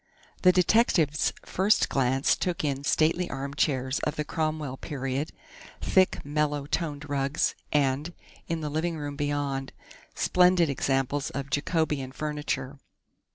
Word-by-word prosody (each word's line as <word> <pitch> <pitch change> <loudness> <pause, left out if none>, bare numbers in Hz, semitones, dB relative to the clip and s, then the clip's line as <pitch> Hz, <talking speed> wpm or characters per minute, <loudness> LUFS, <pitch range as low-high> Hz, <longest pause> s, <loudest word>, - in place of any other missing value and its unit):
The 180 - +7
detective's 180 - +3
first 195 +4 +2
glance 135 0 +2
took 180 -3 -2
in 140 -2 -1
stately 160 +5 +2
armchairs 135 -1 -1
of 150 - -2
the 150 - -2
Cromwell 155 -4 -2
period, 135 0 -3 0.5
thick, 185 -5 +2
mellow 150 -1 0
toned 150 -1 -3
rugs, 140 0 0 0.2
and, 145 +2 +1 0.4
in 165 -1 -2
the 150 - -3
living 160 +2 -1
room 145 -1 -5
beyond, 145 -2 -2 0.4
splendid 180 -3 +4
examples 135 +1 0
of 140 0 -5
Jacobean 150 -3 0
furniture. 145 -2 -3
145 Hz, 120 wpm, -27 LUFS, 135-160 Hz, 0.5 s, The